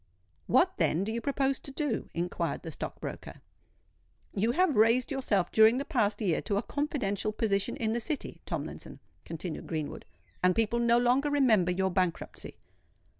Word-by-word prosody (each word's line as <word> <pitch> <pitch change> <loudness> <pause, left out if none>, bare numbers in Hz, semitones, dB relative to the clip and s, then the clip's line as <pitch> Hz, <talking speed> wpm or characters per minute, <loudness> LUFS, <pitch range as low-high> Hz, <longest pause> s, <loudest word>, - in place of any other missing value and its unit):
"What, 365 +1 +3
then, 170 +5 +1
do 215 - -3
you 235 +1 -3
propose 275 0 0
to - - -9
do?" 275 -4 -2
inquired 175 +1 -2
the - - -6
stock - - -6
broker. - - -7 0.9
"You 220 +4 +1
have 355 -3 +2
raised 230 +5 +4
yourself 220 -9 0
during 220 +2 +6
the 280 - -2
past 230 -8 0
year 180 -6 +1
to 200 - -1
a 205 - 0
confidential 220 -9 -1
position 200 -2 -1
in 220 -1 -1
the 235 - 0
City, 285 +5 -4
Tomlinson," - - -6 0.3
continued 165 0 -6
Greenwood: 155 -3 -4 0.4
"and 180 0 +3
people 225 +1 +1
no 235 0 +4
longer 250 +4 +3
remember 235 -11 +3
your 190 +1 0
bankruptcy." 180 -2 -2
225 Hz, 165 wpm, -29 LUFS, 195-270 Hz, 0.9 s, during